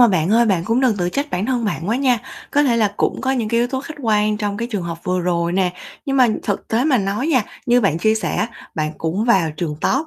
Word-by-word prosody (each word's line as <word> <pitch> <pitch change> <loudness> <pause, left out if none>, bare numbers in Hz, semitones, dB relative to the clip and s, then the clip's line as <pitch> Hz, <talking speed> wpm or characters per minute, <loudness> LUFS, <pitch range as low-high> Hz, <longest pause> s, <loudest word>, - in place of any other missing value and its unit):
mà 240 - +8
bạn 180 -3 +1
ơi 235 +2 +4
bạn 180 -5 +1
cũng 230 +5 +1
đừng 245 -6 +2
tự 175 -1 0
trách 280 +9 -2
bản 190 +5 -1
thân 250 -3 0
bạn 200 -3 -2
quá 230 - +1
nha, 255 -3 +2 0.3
có 290 - +3
thể 250 -5 +2
là 210 -3 +1
cũng - - 0
có 265 - 0
những 235 -5 -1
cái 235 +1 +2
yếu 240 - +2
tố 265 0 -2
khách 310 +2 -8
quan 210 -1 +2
trong 205 -1 -2
cái 235 +3 -3
trường 205 -5 -2
hợp 170 -1 -5
vừa 180 0 0
rồi 170 -1 0
nè, 185 -1 +1 0.3
nhưng 275 -1 0
mà 255 -2 +5
thực 205 - -3
tế 230 +3 +1
mà 285 -5 +3
nói 200 +6 -1
nha, 270 -8 +3 0.2
như 245 +1 +4
bạn 180 -6 +1
chia 220 +5 +3
sẻ 220 - -2
á 215 - 0 0.3
bạn 155 -1 -2
cũng 175 +7 -1
vào 190 -9 +3
trường 150 -2 -3
top, 280 +5 +1
215 Hz, 285 wpm, -20 LUFS, 180-245 Hz, 0.3 s, mà